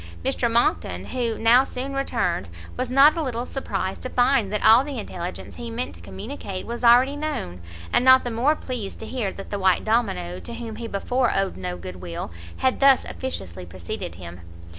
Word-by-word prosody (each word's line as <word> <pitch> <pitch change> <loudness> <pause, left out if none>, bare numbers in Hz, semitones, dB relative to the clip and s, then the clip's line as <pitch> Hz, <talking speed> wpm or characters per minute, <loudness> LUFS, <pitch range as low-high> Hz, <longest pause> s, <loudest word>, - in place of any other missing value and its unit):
Mr 235 - +1
Monckton, 90 - +1
who 235 -3 -2
now 235 +3 +6
soon 270 +1 -5
returned, 230 - -1 0.3
was 255 -1 -2
not 275 +4 +6
a 330 - -1
little 245 -4 -2
surprised 195 -9 -3
to 255 - -4
find 245 -5 +2
that 210 - -1
all 220 +4 +8
the 280 -2 -6
intelligence 170 - -6
he 80 -1 -6
meant 85 +4 -4
to 85 - -14
communicate 185 - -7
was 235 +1 -6
already 250 +4 +6
known: 290 - -4 0.3
and - - +4
not 260 0 +7
the 245 - -3
more 255 +7 +2
pleased 245 -9 -5
to - - -8
hear 225 -5 -2
that 195 - -10
the 205 - -2
white 190 -1 +3
domino, 90 - 0
to 85 - -8
whom 230 -2 -6 0.2
before 245 +5 0
he - - +1
owed 195 -1 -1
no 90 -1 -4
good 90 +1 -8
will, 85 -2 -6 0.3
had 260 -1 +1
thus 275 -1 +5
officiously 95 - -6
preceded 85 -1 -6
him. 85 0 -10
220 Hz, 195 wpm, -24 LUFS, -, 0.3 s, all